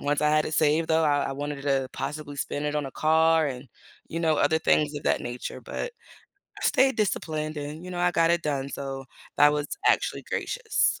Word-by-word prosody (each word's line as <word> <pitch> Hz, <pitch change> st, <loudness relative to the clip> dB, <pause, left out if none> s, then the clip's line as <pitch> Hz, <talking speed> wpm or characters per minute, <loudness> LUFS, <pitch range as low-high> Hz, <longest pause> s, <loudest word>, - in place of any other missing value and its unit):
once 145 Hz, +1 st, 0 dB
I 150 Hz, -, +3 dB
had 155 Hz, 0 st, +3 dB
it 155 Hz, -, -3 dB
saved 155 Hz, +2 st, +3 dB
though, 160 Hz, 0 st, +3 dB
I 145 Hz, -1 st, +2 dB
I -, -, -2 dB
wanted 145 Hz, 0 st, -5 dB
to 135 Hz, -2 st, +1 dB
possibly 150 Hz, -1 st, -5 dB
spend 145 Hz, +1 st, -3 dB
it 150 Hz, 0 st, -1 dB
on 145 Hz, -2 st, -1 dB
a -, -, -6 dB
car 160 Hz, 0 st, +3 dB
and, 130 Hz, -2 st, -5 dB, 0.4 s
you 165 Hz, -, -3 dB
know, 160 Hz, -2 st, +3 dB
other 160 Hz, +2 st, +3 dB
things 150 Hz, -1 st, +2 dB
of 145 Hz, -, -5 dB
that -, -, +1 dB
nature, 120 Hz, +1 st, -6 dB
but -, -, -5 dB, 0.7 s
I -, -, -4 dB
stayed 265 Hz, -2 st, +3 dB
disciplined 155 Hz, -7 st, -1 dB
and, 150 Hz, +3 st, -6 dB
you 180 Hz, -, -7 dB
know, 175 Hz, -, -3 dB
I 180 Hz, 0 st, +3 dB
got 165 Hz, -1 st, +3 dB
it 170 Hz, 0 st, +2 dB
done, 140 Hz, -3 st, -2 dB
so 135 Hz, -1 st, -5 dB, 0.3 s
that 145 Hz, +1 st, +6 dB
was 150 Hz, 0 st, -1 dB, 0.2 s
actually -, -, +2 dB
gracious. 465 Hz, -4 st, 0 dB
150 Hz, 220 wpm, -26 LUFS, 145-160 Hz, 0.7 s, that